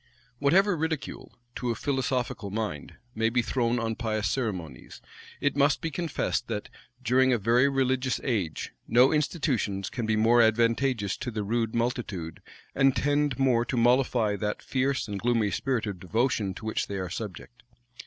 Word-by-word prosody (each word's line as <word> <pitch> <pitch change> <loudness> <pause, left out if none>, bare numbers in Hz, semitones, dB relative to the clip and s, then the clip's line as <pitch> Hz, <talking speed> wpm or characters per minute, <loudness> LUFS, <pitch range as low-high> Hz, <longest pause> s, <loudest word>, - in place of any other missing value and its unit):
Whatever 185 +7 +4
ridicule, 160 -2 -4 0.2
to 125 - -2
a 115 - 0
philosophical 125 -5 -2
mind, 105 -8 -4 0.2
may 115 +1 +1
be 120 +1 +1
thrown 120 0 0
on 115 -1 -1
pious 110 -4 -1
ceremonies, 95 - -4 0.4
it 145 - 0
must 145 +1 +3
be 165 - -3
confessed 150 -5 -2
that, 105 -3 -4 0.3
during 130 +3 +3
a 125 - +3
very 120 +6 +3
religious 130 -1 0
age, 100 - -2 0.2
no 125 +3 +5
institutions 135 - -1
can 120 -4 -3
be 110 - +2
more 115 +2 +5
advantageous 115 -1 +2
to 130 - -4
the 110 -3 -3
rude 115 +2 -1
multitude, 115 -9 -3 0.3
and 135 -1 +3
tend 145 -1 +1
more 130 -4 +3
to 120 +1 -3
mollify 120 -3 +3
that 105 +1 -3
fierce 135 -1 0
and 100 -1 -4
gloomy 115 -3 +1
spirit 130 -5 -1
of 100 -4 -5
devotion 105 0 0
to 110 - -9
which 110 - -1
they 100 - -4
are 95 -2 -4
subject. 110 +4 -7
120 Hz, 165 wpm, -27 LUFS, 110-130 Hz, 0.4 s, no